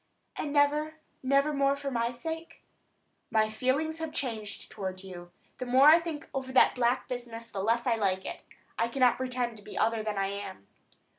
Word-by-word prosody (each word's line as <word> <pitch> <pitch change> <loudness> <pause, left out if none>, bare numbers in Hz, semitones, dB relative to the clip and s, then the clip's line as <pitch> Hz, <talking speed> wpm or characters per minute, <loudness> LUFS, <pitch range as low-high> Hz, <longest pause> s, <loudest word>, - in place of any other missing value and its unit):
"And 290 - -3
never, 300 +2 +2 0.3
never 275 +3 +2
more 275 0 +2
for 280 0 -4
my 235 -1 0
sake?" 325 +6 -7 0.7
"My 215 -1 +2
feelings 280 +8 0
have 320 -1 -4
changed 220 -8 -4
toward 190 -2 -5
you. 175 -2 -10 0.3
The 255 - -4
more 260 +4 +7
I 325 +2 +8
think 325 -2 -6
over 265 -1 -3
that 260 - +6
black 245 0 +1
business 235 -2 -6
the 195 - -3
less 230 +4 +1
I 235 -3 +2
like 190 -3 0
it. - - -6 0.4
I 230 - +2
cannot 250 0 +3
pretend 250 -3 -2
to 205 - -13
be - - -9
other 225 0 +2
than 215 -1 -3
I 195 0 +1
am." 200 - -7
245 Hz, 190 wpm, -29 LUFS, 215-280 Hz, 0.7 s, I